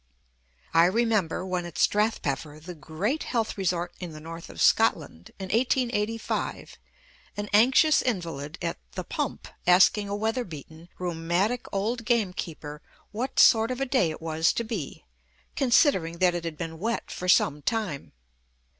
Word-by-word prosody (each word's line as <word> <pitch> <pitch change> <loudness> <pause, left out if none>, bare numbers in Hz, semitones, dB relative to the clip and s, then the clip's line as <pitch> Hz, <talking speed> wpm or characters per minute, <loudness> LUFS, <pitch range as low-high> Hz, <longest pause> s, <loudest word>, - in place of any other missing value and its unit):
I 165 +1 +6
remember, 200 -4 +1
when 180 -1 -2
at 165 -2 -10
Strathpeffer, 160 -8 0
the 175 +4 -9
great 175 - -3
health 230 -3 -2
resort 180 -3 -1
in 175 -3 -7
the 155 - -9
North 165 +2 -9
of - - -11
Scotland, 80 +2 +2
in 190 -1 -7
1885, 230 -2 -1 0.6
an 205 0 -3
anxious 260 +8 +5
invalid 165 - -3
at 170 - -3
"The - - -4
Pump" - - -4 0.2
asking 190 +3 +5
a 200 - -2
weather 225 +4 -1
beaten, 160 - -11
rheumatic 180 +7 -1
old 225 +5 -2
gamekeeper 180 -10 -2 0.3
what 240 +5 -4
sort 225 -1 +6
of 255 0 -3
a 270 - 0
day 250 -10 +2
it 155 - -7
was 160 0 +2
to 235 - -2
be, 215 -10 -6 0.5
considering 235 - +3
that 180 0 +3
it 175 -1 -4
had 160 -2 -5
been 165 -1 -6
wet 230 +5 -3
for 180 - -4
some 150 -4 +3
time. 205 -5 -3
185 Hz, 150 wpm, -26 LUFS, 165-225 Hz, 0.6 s, I